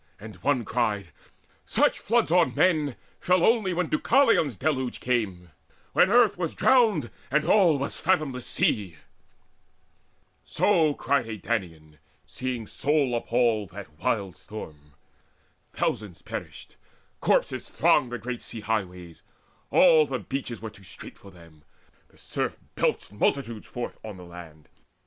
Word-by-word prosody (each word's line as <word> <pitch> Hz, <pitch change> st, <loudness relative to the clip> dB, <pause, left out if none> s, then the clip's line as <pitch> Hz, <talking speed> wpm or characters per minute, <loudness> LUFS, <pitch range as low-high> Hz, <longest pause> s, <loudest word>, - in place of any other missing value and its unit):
And 110 Hz, 0 st, -10 dB
one 130 Hz, -5 st, 0 dB
cried: 105 Hz, -5 st, -1 dB, 0.5 s
"Such -, -, +1 dB
floods 230 Hz, -5 st, +1 dB
on 175 Hz, -1 st, +3 dB
men 155 Hz, -7 st, +2 dB, 0.2 s
Fell 180 Hz, -1 st, +3 dB
only 225 Hz, -5 st, +3 dB
when 180 Hz, 0 st, 0 dB
Deucalion's 205 Hz, -, +3 dB
deluge 130 Hz, -4 st, -1 dB
came, 95 Hz, -9 st, -2 dB, 0.4 s
When 185 Hz, -, +5 dB
earth 220 Hz, -4 st, +4 dB
was 170 Hz, -3 st, -2 dB
drowned, 220 Hz, -, +3 dB, 0.2 s
and 150 Hz, +3 st, +1 dB
all 180 Hz, -8 st, +5 dB
was 140 Hz, -, -4 dB
fathomless 155 Hz, -8 st, 0 dB
sea!" 95 Hz, -6 st, 0 dB, 1.5 s
So 160 Hz, -7 st, +2 dB
cried 140 Hz, -5 st, 0 dB
a 110 Hz, -, -4 dB
Danaan, 80 Hz, -9 st, -4 dB, 0.3 s
seeing 125 Hz, -3 st, -4 dB
soul 140 Hz, +2 st, 0 dB
appalled 115 Hz, -3 st, +1 dB
That 90 Hz, -7 st, -10 dB
wild 100 Hz, -6 st, -1 dB
storm. 75 Hz, -8 st, -10 dB, 0.8 s
Thousands 100 Hz, -5 st, -3 dB
perished; -, -, -8 dB, 0.4 s
corpses -, -, 0 dB
thronged 125 Hz, -, +3 dB
The 120 Hz, -, -3 dB
great 120 Hz, +2 st, -5 dB
sea 115 Hz, -, -8 dB
highways: 90 Hz, -6 st, -4 dB, 0.5 s
all 160 Hz, -4 st, +6 dB
the 130 Hz, -, -2 dB
beaches 125 Hz, -3 st, -5 dB
were 110 Hz, -, -5 dB
Too 100 Hz, -, -17 dB
strait 90 Hz, -, -10 dB
for 100 Hz, -, -14 dB
them: 85 Hz, -4 st, -17 dB, 0.5 s
the -, -, -26 dB
surf -, -, -3 dB, 0.2 s
belched -, -, -1 dB
multitudes 115 Hz, 0 st, -1 dB
Forth 120 Hz, -, -6 dB
on 105 Hz, -3 st, -8 dB
the 90 Hz, -, -11 dB
land. 85 Hz, -3 st, -12 dB
120 Hz, 135 wpm, -26 LUFS, 100-155 Hz, 1.5 s, all